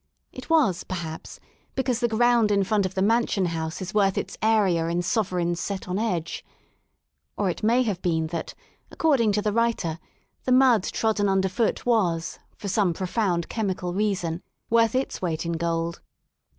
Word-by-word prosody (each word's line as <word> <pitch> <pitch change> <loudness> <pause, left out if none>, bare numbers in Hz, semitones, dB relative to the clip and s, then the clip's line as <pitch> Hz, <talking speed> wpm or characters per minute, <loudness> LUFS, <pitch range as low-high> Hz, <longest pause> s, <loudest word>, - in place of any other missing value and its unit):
It - - -10
was, 295 - +3
perhaps, 165 -3 -6 0.4
because 255 -3 0
the 240 - +2
ground 235 -1 +3
in 200 -1 +3
front 200 0 +1
of 185 - -12
the 190 - +1
Mansion 220 -3 +2
House 165 +1 -3
is 185 - -7
worth 195 -2 +2
its - - -3
area 200 -7 +2
in 170 +1 -1
sovereigns 175 -4 0
set 195 -2 -4
on 185 +2 -1
edge. 180 -7 -2 0.9
Or 200 -3 +1
it - - -8
may 235 +4 +3
have 205 -7 -2
been 160 -2 0
that, 165 - -4 0.3
according 270 -9 +2
to 210 0 0
the 210 -2 0
writer, 225 -8 0 0.4
the 255 - -1
mud 255 -4 +5
trodden 215 -2 0
underfoot 195 +4 0
was, 180 -9 +1 0.2
for 205 - -6
some 195 -3 +1
profound 180 -2 -1
chemical 185 -5 -2
reason, 185 -4 -1 0.3
worth 230 0 +4
its 260 - -1
weight 170 -3 -2
in 170 - -1
gold. 165 0 -2
195 Hz, 165 wpm, -25 LUFS, 175-225 Hz, 0.9 s, mud